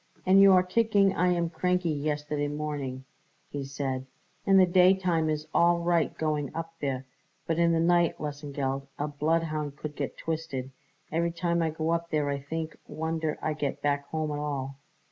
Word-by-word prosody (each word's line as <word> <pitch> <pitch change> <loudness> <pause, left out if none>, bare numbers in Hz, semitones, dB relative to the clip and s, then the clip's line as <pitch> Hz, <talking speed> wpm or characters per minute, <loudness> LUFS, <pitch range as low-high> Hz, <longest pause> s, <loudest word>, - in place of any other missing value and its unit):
"And 190 +1 +6
you 195 0 +8
are 180 -1 +6
kicking 200 0 +3
I 180 0 +2
am 170 -1 -1
cranky 180 -2 0
yesterday 150 0 -1
morning," 145 -3 -4 0.5
he 145 -1 -3
said. 135 -1 -3 0.4
"In 195 0 +6
the 185 - +7
daytime 180 -2 +3
is 155 0 -2
all 170 0 +4
right 170 -1 +2
going 150 -3 -1
up 165 0 -4
there, 135 -2 -2 0.4
but 165 0 0
in 170 0 +4
the 165 - +2
night, 175 0 +3
Lesengeld, 140 -2 -3
a 145 - -1
bloodhound 155 0 -1
could 150 -1 -6
get 140 -2 -4
twisted. 140 -5 -4 0.4
Every 170 +2 +1
time 170 0 0
I 165 - +1
go 160 +1 -2
up 170 0 -1
there 150 -2 0
I 140 0 -1
think 160 +3 -5
wonder 160 -1 -2
I 155 - 0
get 145 -2 -3
back 140 -1 0
home 155 0 -2
at 145 - -3
all." 140 -2 -4
155 Hz, 180 wpm, -28 LUFS, 145-170 Hz, 0.5 s, you